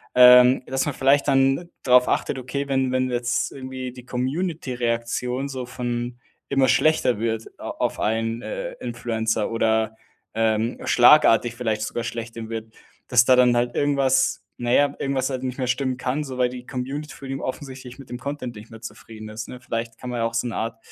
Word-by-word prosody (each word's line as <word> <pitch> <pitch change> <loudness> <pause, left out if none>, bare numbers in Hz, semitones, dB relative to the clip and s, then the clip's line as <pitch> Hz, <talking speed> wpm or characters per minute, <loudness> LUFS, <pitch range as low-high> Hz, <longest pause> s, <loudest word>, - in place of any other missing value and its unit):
Ähm, 125 +1 +8
dass 135 0 0
man 145 - -3
vielleicht 140 +2 +3
dann 135 +4 +2
drauf 125 -1 +5
achtet: 135 - 0
„Okay, 140 +3 -4
wenn 130 -1 +1
wenn 130 0 0
jetzt 120 0 -1
irgendwie 130 -1 -6
die 125 0 -13
Community-Reaktion 125 -3 -2
so 130 -2 -5
von 120 0 -4 0.3
immer 135 -1 +3
schlechter 155 -6 +3
wird 115 0 -2
a - - -6
auf - - -2
einen, 115 +1 -1
äh, - - -5
Influencer 110 -2 -2
oder, 110 -1 +1 0.4
ähm, 110 +1 0
schlagartig 120 -3 +5
vielleicht 110 -3 -2
sogar 115 +2 -3
schlechter 115 -1 -6
wird, 110 -1 -6 0.4
dass 120 -1 +5
da 130 - +6
dann 125 -1 +5
halt 120 0 0
irgendwas 135 -2 +2 0.3
na 120 - 0
ja, 145 +2 +4
irgendwas 135 -1 -1
halt 130 -1 -3
nicht 125 -1 -3
mehr 130 - -1
stimmen 130 +1 -1
kann.“ 130 +4 -2
So, 130 -3 -7
weil 125 -1 +2
die 125 0 -9
Community 135 +4 -5
für 135 - -10
ihn 135 0 -4
offensichtlich 130 -1 -6
mit 135 - -13
dem 125 - -5
Content 130 -2 -5
nicht 105 +1 -11
mehr 110 - -10
zufrieden 110 -2 -10
ist, 110 +1 -6
ne? 125 - -8
Vielleicht 115 -1 -4
kann 125 -1 -7
man 120 - -3
ja 115 - +1
auch 115 0 -3
so 115 - 0
'ne 115 - -5
Art 115 0 -3
125 Hz, 190 wpm, -23 LUFS, 115-135 Hz, 0.4 s, Ähm